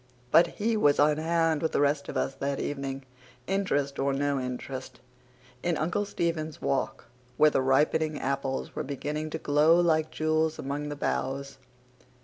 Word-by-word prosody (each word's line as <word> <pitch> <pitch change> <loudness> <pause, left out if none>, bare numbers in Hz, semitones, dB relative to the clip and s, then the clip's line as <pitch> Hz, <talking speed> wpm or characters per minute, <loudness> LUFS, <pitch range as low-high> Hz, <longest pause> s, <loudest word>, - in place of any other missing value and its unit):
But 170 +1 +7
he 225 +2 +1
was 145 -9 +4
on 150 +1 +4
hand 165 -1 +1
with 160 - -1
the - - +2
rest 145 0 +1
of - - -3
us 135 - 0
that 140 0 -3
evening, 135 -1 -4 0.4
interest 145 -8 -1
or 135 0 +1
no 140 0 0
interest, 130 0 -6 0.6
in 175 -2 0
Uncle 175 +6 0
Stephen's 165 -5 -2
Walk, 70 - -2 0.3
where 155 0 +6
the - - +2
ripening 150 +3 +2
apples 135 0 -2
were - - -2
beginning 150 +3 -4
to - - -3
glow 150 +4 +4
like 155 -2 +2
jewels 155 0 0
among 145 +2 -4
the 145 - -4
boughs. 135 0 -3
150 Hz, 160 wpm, -28 LUFS, 140-160 Hz, 0.6 s, But